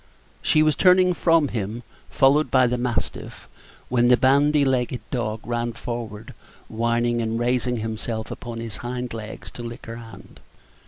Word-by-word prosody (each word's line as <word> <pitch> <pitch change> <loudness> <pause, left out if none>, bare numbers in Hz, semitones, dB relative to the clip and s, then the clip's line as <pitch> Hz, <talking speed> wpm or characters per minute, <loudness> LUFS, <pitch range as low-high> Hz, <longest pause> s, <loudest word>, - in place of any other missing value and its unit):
She 155 - +3
was 155 -1 +3
turning 180 +1 +5
from 165 -4 +3
him, 110 +2 -4 0.3
followed 140 +3 +3
by 130 -1 +4
the 125 0 0
mastiff, 120 -1 -3 0.4
when 120 -1 +2
the 125 0 +6
bandy 140 +3 +4
legged 125 -2 0
dog 110 -4 -3
ran 120 0 -2
forward, 115 -2 -6 0.3
whining, 120 +1 0
and 115 0 -1
raising 125 +1 0
himself 110 0 -4
upon 120 -2 -6
his 115 -3 -6
hind 125 +1 -5
legs 110 -1 -8
to - - -9
lick 120 0 -8
her 115 0 -7
hand. 115 -1 -13
120 Hz, 155 wpm, -23 LUFS, 115-130 Hz, 0.4 s, the